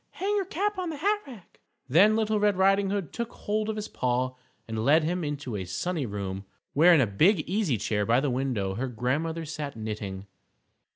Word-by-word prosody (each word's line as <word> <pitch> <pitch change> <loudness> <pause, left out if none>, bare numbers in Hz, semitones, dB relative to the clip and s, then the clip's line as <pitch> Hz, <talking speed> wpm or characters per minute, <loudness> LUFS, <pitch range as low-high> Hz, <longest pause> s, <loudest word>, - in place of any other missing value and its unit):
Hang 405 +2 -1
your 400 -2 0
cap 405 +3 -2
on 360 -2 -2
the 320 - -4
hat 405 +8 +1
rack." 230 -9 -13 0.3
Then 190 +11 +5
Little 220 -1 +1
Red 205 -2 +2
Riding 195 +1 +3
Hood 195 -5 -3
took 235 -1 -4
hold 215 +1 -2
of 220 - -2
his 215 -1 -4
paw, 125 +1 -1 0.3
and 110 -1 -3
led 155 +6 +5
him 175 +3 -1
into 145 -6 -4
a 95 -2 -3
sunny 145 - -2
room, 100 -2 -4 0.3
where 165 +5 +6
in 150 - +5
a - - +4
big 155 - +3
easy 185 - +1
chair 105 0 -1
by 115 +4 +3
the 140 -1 0
window 125 -7 -1
her 125 +7 -2
Grandmother 145 +8 -2
sat 150 -3 -5
knitting. 105 -3 -5
155 Hz, 205 wpm, -27 LUFS, -, 0.3 s, where